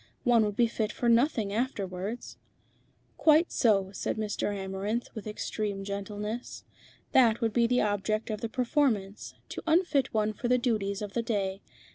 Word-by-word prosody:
"One 240 -3 +5
would 205 -1 -2
be 240 - +4
fit 225 -1 -2
for 240 - -2
nothing 230 -4 +3
afterwards." 205 -2 -3 0.8
"Quite 315 +2 +4
so," 195 -5 +2
said - - -3
Mr. 210 -1 -1
Amarinth, 200 +4 -3
with 220 -2 -7
extreme 210 -1 -3
gentleness. 205 +3 -5 0.5
"That 235 -4 +5
would 225 -2 0
be 235 -1 +3
the 250 +1 +2
object 210 +2 -1
of 215 - -4
the 230 - -2
performance, 235 -6 0
to - - -5
unfit 320 -4 +2
one 215 -1 +1
for 240 - -3
the 250 +1 +4
duties 215 -4 -1
of 205 -1 -6
the 235 - 0
day. 200 -4 -2
215 Hz, 160 wpm, -29 LUFS, 200-240 Hz, 0.8 s, One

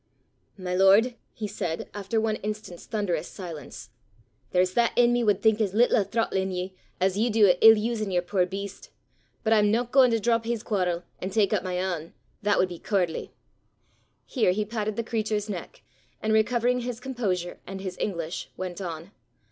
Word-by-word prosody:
"My 185 -2 -4
lord," 195 +6 +5 0.2
he 215 - -5
said, 180 -5 -4
after 205 +2 -1
one 220 -1 0
instant's 210 -4 -6
thunderous 180 -7 -1
silence, 170 -7 -9 0.6
"there's 180 0 +2
that 235 +2 +2
i' 245 - +7
me 240 0 +2
wad 205 -3 +2
think 220 0 +4
as 200 -2 0
little 240 +2 +4
o' 210 - +3
throttlin' 195 -3 -1
ye 185 0 -4 0.3
as 190 +2 +1
ye 235 +3 +2
du 215 -2 +5
o' 180 - +6
ill 225 0 +9
usin' 215 -1 -1
yer 180 -2 +1
puir 180 0 +1
beast. 195 +1 -7 0.5
But 225 -1 +3
I'm 210 -1 +4
no 230 +3 +2
gaein' 255 +1 +5
to 230 -1 +1
drop 230 +1 +1
his 235 -1 -2
quarrel, 180 -4 -1 0.2
an' 185 - -3
tak 200 -1 +2
up - - +2
my 185 -1 -4
ain: 180 -3 -3 0.3
that 205 -1 +2
wad 185 - +2
be 175 -2 -8
cooardly." 180 -5 -1 0.9
Here 220 -9 +2
he 210 +2 -1
patted 215 -1 -3
the 230 - -2
creature's 215 -2 -1
neck, 180 - -8 0.4
and 220 0 0
recovering 240 +3 +2
his 245 -1 -4
composure 205 -9 -3
and 195 +1 -6
his 190 -1 -5
English, 170 -4 -3
went 185 0 -5
on. 170 0 -6
205 Hz, 190 wpm, -26 LUFS, 185-225 Hz, 0.9 s, ill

